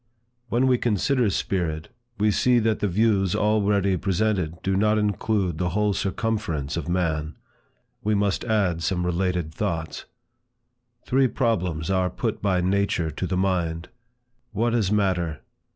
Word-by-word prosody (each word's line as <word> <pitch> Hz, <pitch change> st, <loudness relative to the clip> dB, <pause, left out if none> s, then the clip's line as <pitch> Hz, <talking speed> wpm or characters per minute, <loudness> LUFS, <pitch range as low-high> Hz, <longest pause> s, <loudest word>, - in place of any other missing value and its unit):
When 120 Hz, +3 st, +2 dB
we 125 Hz, -2 st, +3 dB
consider 120 Hz, +2 st, +1 dB
Spirit, 85 Hz, -5 st, -2 dB, 0.3 s
we 105 Hz, 0 st, +3 dB
see 125 Hz, +4 st, +3 dB
that 110 Hz, -2 st, +1 dB
the 105 Hz, -, 0 dB
views 95 Hz, -1 st, +2 dB
already 100 Hz, -2 st, +2 dB
presented 90 Hz, -3 st, -1 dB
do 95 Hz, 0 st, 0 dB
not 105 Hz, +2 st, +3 dB
include 100 Hz, -4 st, 0 dB
the 90 Hz, -, 0 dB
whole 105 Hz, -1 st, +2 dB
circumference 95 Hz, -9 st, -2 dB
of 85 Hz, -1 st, -4 dB
man. 80 Hz, -4 st, -1 dB, 0.7 s
We 105 Hz, 0 st, +1 dB
must 100 Hz, -1 st, 0 dB
add 100 Hz, -7 st, +1 dB
some 90 Hz, 0 st, -1 dB
related 90 Hz, -2 st, -1 dB
thoughts. 80 Hz, -1 st, -3 dB, 1.0 s
Three 135 Hz, +1 st, +3 dB
problems 90 Hz, -, -1 dB
are 95 Hz, -1 st, +1 dB
put -, -, -3 dB
by 95 Hz, -3 st, +1 dB
nature 95 Hz, -3 st, 0 dB
to 90 Hz, +5 st, -4 dB
the 90 Hz, +1 st, -1 dB
mind; 85 Hz, -3 st, -1 dB, 0.6 s
What 115 Hz, +3 st, 0 dB
is 105 Hz, -5 st, +1 dB
matter? 90 Hz, -7 st, 0 dB
95 Hz, 140 wpm, -24 LUFS, 85-105 Hz, 1.0 s, we